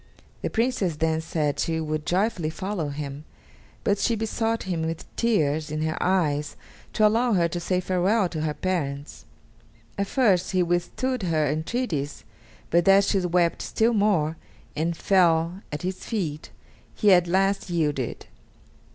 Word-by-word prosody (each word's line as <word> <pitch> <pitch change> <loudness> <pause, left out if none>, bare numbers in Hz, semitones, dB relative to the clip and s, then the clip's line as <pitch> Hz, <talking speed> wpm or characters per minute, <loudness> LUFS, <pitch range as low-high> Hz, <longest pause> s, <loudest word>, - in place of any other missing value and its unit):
The - - -1
Princess 225 -8 0
then 160 +1 0
said 155 -3 -1
she 165 -1 0
would 155 -1 -3
joyfully 180 -3 0
follow 185 -2 -3
him, 140 0 -6 0.6
but 200 -1 +1
she 230 - +1
besought 225 +1 -1
him 175 -3 -2
with 160 0 -3
tears 155 -9 +1
in 155 +1 -2
her 160 0 -1
eyes 150 -6 +1 0.4
to 215 - +3
allow 230 +3 +3
her 175 -3 +3
to 175 - -3
say 180 +1 0
farewell 185 +3 +1
to 160 -3 -4
her 155 -1 -1
parents. 145 -6 -3 0.7
At 200 - 0
first 195 -10 +2
he 185 -1 +3
withstood 175 +9 -1
her 160 -4 +1
entreaties, 155 - -2 0.5
but 170 +1 +3
as 195 +1 +6
she 195 - +2
wept 175 -1 +1
still 230 +2 +1
more, 190 -7 +2 0.4
and 165 +2 -1
fell 175 -1 +2
at 150 +2 -5
his 185 +1 -4
feet, 165 -10 -3 0.5
he 205 -3 +5
at 175 -1 +4
last 195 +2 +1
yielded. 150 -7 -1
175 Hz, 150 wpm, -25 LUFS, 155-200 Hz, 0.7 s, as